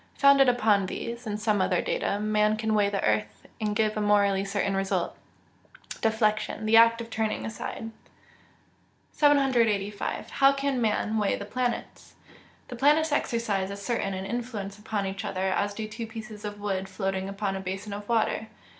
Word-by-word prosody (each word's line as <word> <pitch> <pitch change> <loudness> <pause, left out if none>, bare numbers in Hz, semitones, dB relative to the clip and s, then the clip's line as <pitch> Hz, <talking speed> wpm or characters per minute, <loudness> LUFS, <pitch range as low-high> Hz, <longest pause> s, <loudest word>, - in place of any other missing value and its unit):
Founded 280 -2 +6
upon 215 -5 +3
these, 235 +4 -5
and 210 0 -3
some 215 -2 +1
other - - +2
data, - - -1
man 215 0 +2
can 220 0 -1
weigh 205 -1 +3
the 200 -1 -2
earth, 105 -1 -1 0.2
and 210 -1 -1
give 215 -1 +1
a 215 - -1
morally 200 -2 +3
certain 200 0 -1
result! 195 0 -1 0.9
Deflection. 220 -1 0
The 220 +1 +3
act 230 0 +6
of 230 0 -9
turning 220 -1 -1
aside. 225 0 -6 1.2
785. 235 -9 +1
How 275 0 +5
can 275 -2 -1
man 220 0 0
weigh 205 -2 +1
the 200 - -6
planets? 245 +3 -4 0.5
The 250 - -6
planets 300 +5 +3
exercise 220 -8 0
as 200 0 -7
certain 215 -5 -1
an 190 0 -5
influence 210 -3 -5
upon 210 -1 -2
each 195 0 -4
other 190 +1 -1
as 205 +1 -1
do 220 0 -4
two 225 +2 -6
pieces 220 -1 -9
of 205 0 -6
wood 195 -2 -2
floating 190 0 -2
upon 200 0 -2
a - - -3
basin 190 +2 -5
of 205 +1 -7
water. 225 -1 +1
215 Hz, 170 wpm, -27 LUFS, 200-230 Hz, 1.2 s, Founded